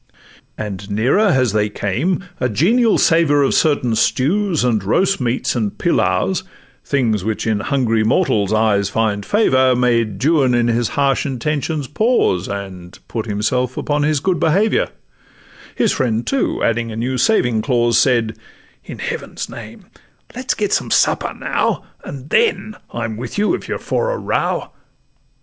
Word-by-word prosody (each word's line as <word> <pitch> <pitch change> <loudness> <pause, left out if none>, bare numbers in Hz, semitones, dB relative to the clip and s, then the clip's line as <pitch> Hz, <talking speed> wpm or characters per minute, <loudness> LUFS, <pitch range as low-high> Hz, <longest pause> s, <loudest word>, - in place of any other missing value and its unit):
And 100 -1 -6
nearer 125 - +2
as 130 - +2
they 105 -1 +1
came, 130 - -1 0.2
a 125 - 0
genial 220 - +3
savour 155 -3 +3
Of 135 - +1
certain 145 -7 +2
stews, 165 - +1
and 115 -5 +1
roast 190 - +1
meats, 125 +1 -1
and 110 -4 -2
pilaus, - - +1 0.4
Things 115 -8 0
which 110 +1 -2
in 110 -2 0
hungry 115 -2 0
mortals' 110 - +1
eyes 105 -2 +2
find 105 -1 -1
favour, 130 - +3
Made 115 -4 +1
Juan 145 -6 +3
in 120 0 +2
his 120 0 +1
harsh 140 0 +1
intentions 145 +2 -2
pause, 150 - +1
And 95 -3 -7
put 115 -1 -4
himself 125 +5 -1
upon 145 0 -1
his 150 0 +1
good 180 +4 0
behaviour: 195 +7 +2 0.9
His - - +2
friend, 115 -2 -1
too, 275 -2 -1
adding 115 0 0
a - - -6
new 125 +3 -2
saving 125 - +2
clause, 120 -2 +1
Said, 115 -4 +2 0.5
'In - - -9
Heaven's - - -5
name - - -10 0.5
let's - - -2
get - - -1
some - - 0
supper - - +2
now, - - -1 0.2
And 140 +1 -9
then 445 - +1 0.2
I'm 110 -2 -4
with 120 - -6
you, 210 +8 +2
if - - -4
you're - - -2
for - - -1
a - - -2
row. - - -2
125 Hz, 155 wpm, -18 LUFS, 110-150 Hz, 0.9 s, genial